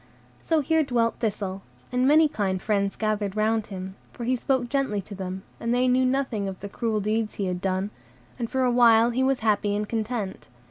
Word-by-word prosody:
So 320 -2 +1
here 320 +3 +2
dwelt 235 -4 0
Thistle, 200 -4 -2 0.3
and 250 +1 +2
many 310 +2 +6
kind 195 -8 -1
friends 200 0 0
gathered 210 -2 -1
round 220 0 +1
him, 190 -2 -6 0.2
for 240 - -8
he 250 +2 +1
spoke 255 0 0
gently 265 -5 0
to 205 - -10
them, 190 -1 -5 0.2
and 230 - -2
they 250 +1 +3
knew 255 +1 +3
nothing 255 -6 0
of 190 -1 -6
the 200 - -7
cruel 220 +1 -1
deeds 215 +1 -1
he 200 - -2
had 180 -1 -2
done; 190 +1 -1 0.5
and 230 -2 -2
for 260 0 0
a 250 - +3
while 235 -1 +5
he 250 +2 0
was 265 -1 +1
happy 205 -2 +1
and 210 0 -2
content. 220 -3 -3
220 Hz, 205 wpm, -25 LUFS, 200-250 Hz, 0.5 s, many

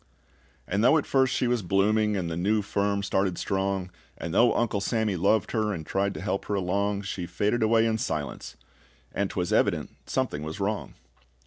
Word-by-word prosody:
And 100 +4 0
though 140 +6 +6
at 150 - 0
first 130 -1 +2
she 130 - 0
was 120 -2 +1
blooming, 105 +3 +2
And 90 -3 -2
the 85 - -3
new 105 +5 +1
firm 100 0 0
started 95 -2 0
strong, 95 -1 -1 0.3
And 85 - -5
though 115 +4 +5
Uncle 110 -4 0
Sammy 110 -1 0
loved 105 +5 +2
her, 110 -2 0
And 80 -4 -6
tried 100 +3 -1
to - - -6
help 100 - -2
her 105 - -1
along, 100 +2 0
She 90 -2 -4
faded 105 +7 0
away 110 +1 +4
in 110 -1 0
silence, 75 - -4 0.6
and 100 0 -1
'twas 90 -2 -2
evident - - +1 0.2
something 75 - -1
was 80 +5 -6
wrong. 100 +1 -2
100 Hz, 190 wpm, -27 LUFS, 95-110 Hz, 0.6 s, though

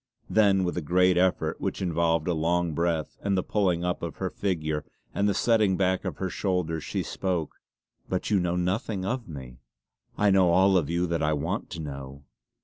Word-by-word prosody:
Then 100 -3 +4
with 90 - -1
a - - 0
great 90 +4 +3
effort, 90 0 +1
which - - -2
involved 85 -2 +1
a 90 - +2
long 85 +1 0
breath 85 0 -1
and 100 -1 0
the 95 - +1
pulling 90 -5 0
up 90 - -1
of - - -4
her - - -3
figure 80 -6 -2 0.3
and 100 +1 +1
the 100 - 0
setting 110 -5 +3
back 95 -1 +1
of - - -3
her 95 - -2
shoulders, 90 -5 -1
she - - -2
spoke: 90 -5 -3 0.5
"But 95 +3 -2
you 100 - +4
know 90 -1 0
nothing 95 +2 -1
of 125 +3 -2
me!" 65 -6 -9 0.6
"I 105 -1 +4
know 95 -2 +5
all 95 +3 +4
of 80 -5 +2
you 85 +1 +1
that 85 -1 -1
I 75 0 +2
want 80 +8 -2
to 85 - -6
know!" 70 -1 -7
90 Hz, 200 wpm, -27 LUFS, 80-95 Hz, 0.6 s, know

